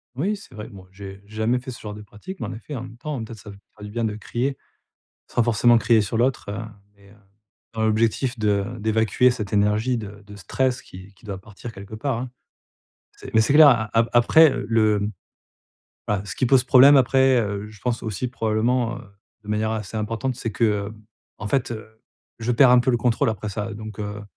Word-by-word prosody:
Oui, 190 +11 -1
c'est 200 - -14
vrai. 105 0 -7
Bon, 95 -3 -13
j'ai 95 0 -10
j'ai 110 +1 -13
jamais 115 +3 +1
fait 130 +1 -8
ce 120 - -10
genre 105 -1 -7
de 105 - -9
pratique. 105 - -10
Mais - - -4
en - - -6
effet, 130 +6 -8
en 120 - -5
même 120 -2 -11
temps, 140 -2 -5
peut-être, 110 0 -9
ça 105 - -12
me 100 - -10 0.2
fera 105 - -14
du 105 - -8
bien 115 +2 -2
de 110 -2 -1
crier, 120 +6 -3 0.7
sans 120 - 0
forcément 120 +1 +4
crier 115 -1 +3
sur 105 +2 -2
l'autre, 125 +3 0
heu 105 +2 -5 0.4
et 100 - -19
heu, - - -18 0.6
dans 110 - -2
l'objectif 115 +3 +1
de 105 -2 +1
d'évacuer 110 +3 +2
cette 105 -5 -5
énergie 105 +4 +2
de 105 -1 -9
de 105 0 -11
stress 130 +7 -1
qui 95 +2 -13
qui 95 - -25
doit 100 -3 -6
partir 105 +4 -10
quelque 100 +1 -10
part, 115 +2 -2
hein. 125 +1 -5 0.9
C'est - - -11
mais 110 - +5
c'est 115 +5 +1
clair, 150 -1 +9
a 115 -4 +2
a 115 - +5
après 150 +7 +6 0.2
le, 110 -2 +3
hem, 105 +1 -2 1.0
voilà 100 -2 0
ce - - -6
qui - - +1
pose 125 +1 +4
problème, 135 +3 +7
après, 130 -1 +4
heu, 105 -1 -4
je 105 -1 -16
pense 120 -2 -2
aussi 110 +3 -3
probablement, 120 +1 0
heu, - - -12 0.4
de - - -14
manière 105 +1 0
assez 110 0 -5
importante, 115 +4 -2
c'est 115 - -4
que, 105 -3 0
hem, 105 0 -13 0.4
en 105 - -5
fait, 130 +1 0
heu, 110 0 -10 0.4
je 115 +1 -1
perds 125 +1 +6
un 125 0 +6
peu 120 - +1
le 120 - +2
contrôle, 115 -1 +1
après 105 -1 -5
ça. 105 +2 -4
Donc, 110 -1 -9
heu, 105 0 -5
110 Hz, 225 wpm, -23 LUFS, 105-125 Hz, 1.0 s, clair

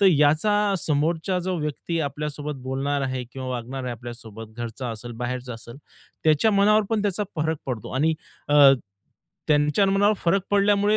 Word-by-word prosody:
तर 200 - +6
याचा 155 +4 +4 0.3
समोरचा 160 +5 0
जो 185 - 0
व्यक्ती 150 +2 -3
आपल्यासोबत 145 0 -5
बोलणार 135 +2 -1
आहे 130 -1 -2
किंवा 130 -1 -5
वागणार 125 +2 -4
आहे 125 - -3
आपल्यासोबत, 115 -2 -9
घरचा 120 +2 -5
असेल, 115 +2 -7
बाहेरचा 125 0 -3
असेल. 120 +2 -11 0.5
त्याच्या 155 +8 +4
मनावर 210 +1 +4
पण 220 -2 +1
त्याचा 205 0 0
फरक 160 +1 0
पडतो 125 -5 -4
आणि 160 +4 +2 0.3
अ, 145 - +3 0.9
त्यांच्या 150 +5 +3
मनावर 200 +2 +3
फरक 190 +2 +1
पडल्यामुळे 205 +1 +3
150 Hz, 155 wpm, -24 LUFS, 125-185 Hz, 0.9 s, तर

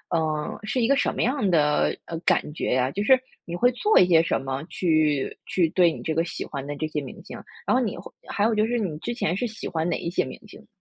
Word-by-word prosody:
嗯， 155 -2 -1
是 245 +4 -1
一 225 - +3
个 275 - +4
什 - - +1
么 - - -1
样 235 -5 +1
的， 150 -3 +2
呃， 165 - -5
感 150 -3 +1
觉 155 - -1
呀？ 130 0 +2
就 205 +5 -2
是 260 +3 +6 0.3
你 170 - -5
会 245 +7 +3
做 420 - +4
一 180 - +6
些 165 -2 +6
什 - - 0
么， 135 +1 -4
去 155 -6 +1
去 175 -3 +2
对 175 0 +4
你 - - -7
这 160 - -1
个 165 +1 +1
喜 170 - -5
欢 140 -2 -6
的 145 +1 -5
这 155 - -2
些 155 -1 -3
明 135 - -9
星， - - -9 0.3
然 - - +2
后 255 - +3
你 215 - -3
会 175 - -9 0.2
还 205 - -1
有 225 - +2
就 215 - +3
是 240 0 0
你 180 -8 -2
之 240 - -3
前 180 -7 -1
是 245 - -1
喜 220 0 -7
欢 165 0 -1
哪 170 - 0
一 170 - -3
些 175 - +1
明 - - -8
星？ - - -15
170 Hz, 295 characters per minute, -25 LUFS, 155-215 Hz, 0.3 s, 是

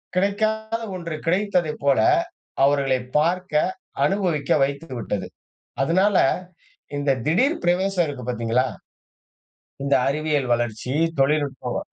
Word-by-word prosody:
கிடைக்காத 220 +3 0
ஒன்று 170 -3 -5
கிடைத்ததைப் 180 -4 0
போல 140 -1 +3 0.6
அவர்களை 135 -2 +3 0.2
பார்க்க 175 +2 0 0.5
அனுபவிக்க 180 -8 0
வைத்துவிட்டது. 130 - -3 0.5
அதனால, 185 +7 +3 0.8
இந்த 140 -1 +1
திடீர் 250 - +2
பிரவேசம் 180 +1 +2
இருக்குது 130 -5 -6
பாத்தீங்களா? 120 +2 +1 1.2
இந்த 140 - +2
அறிவியல் 150 -2 0
வளர்ச்சி 120 +2 -2 0.3
தொழில்நுட்பம் 140 -1 0
155 Hz, 90 wpm, -23 LUFS, 135-185 Hz, 1.2 s, போல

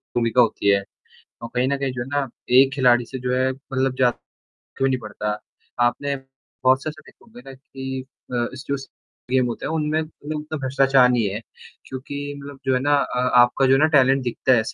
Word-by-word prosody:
भूमिका 120 +1 +3
होती 105 -3 +1
है। 100 0 +4 0.6
और 115 - -6
कहीं 125 +1 +2
न 140 +1 0
कहीं 135 -1 -2
जो 120 - -4
है 120 - -5
ना 140 -1 -1 0.3
एक 135 0 +6
खिलाड़ी 120 -3 +3
से 130 - -7
जो 125 0 -2
है 130 +1 +2
मतलब 135 -1 -2
जा 125 -1 +5 0.7
क्यों 135 0 +2
नहीं 130 -1 0
पड़ता। 105 -1 -4 0.5
आपने 140 +3 -1 0.5
बहुत 130 +1 +4
से - - -4
ऐसे 155 0 -14
देखे - - -20
होंगे 235 +1 -14
ना - - -8
कि 130 0 -7 0.3
अ, - - -2 0.2
स 130 - -9
जस 135 -1 -4 0.4
गेम 130 -1 +3
होते 120 - -4
हैं - - -2
उनमें 155 0 0
मतलब 155 -1 -7
उतना 150 +1 -5
भ्रष्टाचार 135 -1 +4
नहीं 120 -5 +2
है 105 - -4 0.5
क्योंकि 130 +2 -7 0.2
मतलब 140 -1 -10
जो 130 - +3
है 125 - +1
ना 145 +2 +2
अ, 130 -3 -1 0.2
आपका 120 +2 +4
जो 130 - +4
है 135 - +5
ना 155 - +6
टैलेंट 135 0 +4
दिखता 125 +2 +1
है 115 -3 +5
130 Hz, 215 wpm, -22 LUFS, 125-140 Hz, 0.7 s, एक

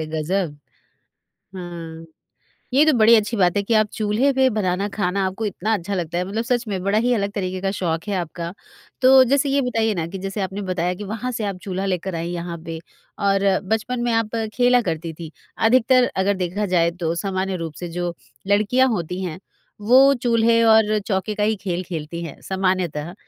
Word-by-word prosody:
ग़ज़ब! 160 +1 -2 1.0
हाँ। 165 -2 -8 0.7
ये 285 +3 +6
तो 310 - +5
बड़ी 225 +2 +7
अच्छी 215 +2 0
बात 180 -2 +2
है 200 - +2
कि 230 - +3
आप 215 -1 +4
चूल्हे 220 +6 +1
पे 265 0 +3
बनाना 195 0 0
खाना 195 -1 0
आपको 190 +4 -4
इतना 210 +2 -2
अच्छा 200 0 -3
लगता 175 -2 -2
है। 180 - 0
मतलब 215 +5 -3
सच 240 0 0
में 190 -3 -3
बड़ा 200 +3 +2
ही 250 - +3
अलग 200 -3 -1
तरीक़े 185 -2 -3
का 195 0 -1
शौक 165 -3 -1
है 205 - -1
आपका। 170 -1 -4 0.5
तो 255 +1 +7 0.2
जैसे 280 0 +3
ये 280 +1 +2
बताइए 225 -2 +1
ना 165 -3 -2
कि 195 - -7
जैसे 195 +2 -4
आपने 195 +1 -3
बताया 180 0 -1
कि - - -4
वहाँ 225 +5 -4
से 220 - -2
आप 200 -2 -3
चूल्हा 190 0 -2
लेकर 185 -1 -2
आई 165 +1 -3
यहाँ 170 -1 -5
पे 165 -1 -5 0.5
और 195 0 +3 0.2
बचपन 230 +3 -1
में 240 -1 0
आप 225 0 0 0.2
खेला 245 0 +4
करती 160 +1 -4
थी। 160 0 -9 0.3
अधिकतर 250 +2 +4 0.2
अगर 200 +1 +2
देखा 200 +4 -2
जाए 170 -1 +3
तो 165 0 0
सामान्य 190 -1 -1
रूप 160 -2 -6
से 175 - -3
जो 175 -1 -2 0.4
लड़कियाँ 230 +6 +3
होती 180 -4 -3
हैं 180 -2 -4 0.5
वो 260 +2 +8 0.2
चूल्हे 230 -1 +3
और 215 -1 +3
चौके 200 +1 -1
का 210 - -2
ही 215 +1 +2
खेल 180 -2 -2
खेलती 170 -1 -5
हैं, 160 - -9
सामान्यतः 185 -4 -1
195 Hz, 200 wpm, -22 LUFS, 175-220 Hz, 1.0 s, वो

